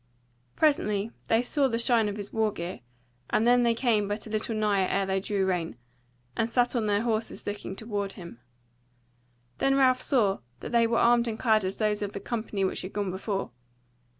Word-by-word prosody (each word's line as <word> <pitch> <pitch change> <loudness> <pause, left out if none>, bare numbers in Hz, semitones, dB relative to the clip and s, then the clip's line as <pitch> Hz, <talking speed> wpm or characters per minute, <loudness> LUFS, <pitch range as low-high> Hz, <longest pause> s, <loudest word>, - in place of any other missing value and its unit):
Presently 215 -8 +1 0.2
they 225 +2 +3
saw 275 +2 +2
the 230 -3 -1
shine 230 -2 +3
of 200 - -4
his 205 -1 -7
war 220 -1 +1
gear, 175 -1 -6 0.5
and 220 - +2
then 245 +1 +5
they 235 -1 +2
came 225 -4 +1
but 205 +1 -4
a 220 - -9
little 220 +1 -2
nigher 205 -3 +2
ere 195 0 +1
they 190 0 0
drew 195 0 -1
rein, 175 -3 -1 0.6
and 225 - 0
sat 245 +1 +2
on 225 -3 0
their 205 +1 +1
horses 225 -1 -2
looking 205 -2 -5
toward 205 -2 -3
him. 170 -10 -11 1.2
Then 270 0 +3
Ralph 255 -2 +4
saw 210 -8 +2 0.2
that - - -6
they 235 -1 +4
were 230 0 +1
armed 235 0 +4
and 220 -1 -3
clad 220 -3 +3
as 185 +1 -3
those 210 -1 0
of 205 -1 -3
the - - -4
company 215 -3 -2
which 190 - -2
had 185 - -7
gone 200 -2 -2
before. 195 - -3
215 Hz, 200 wpm, -27 LUFS, 200-235 Hz, 1.2 s, then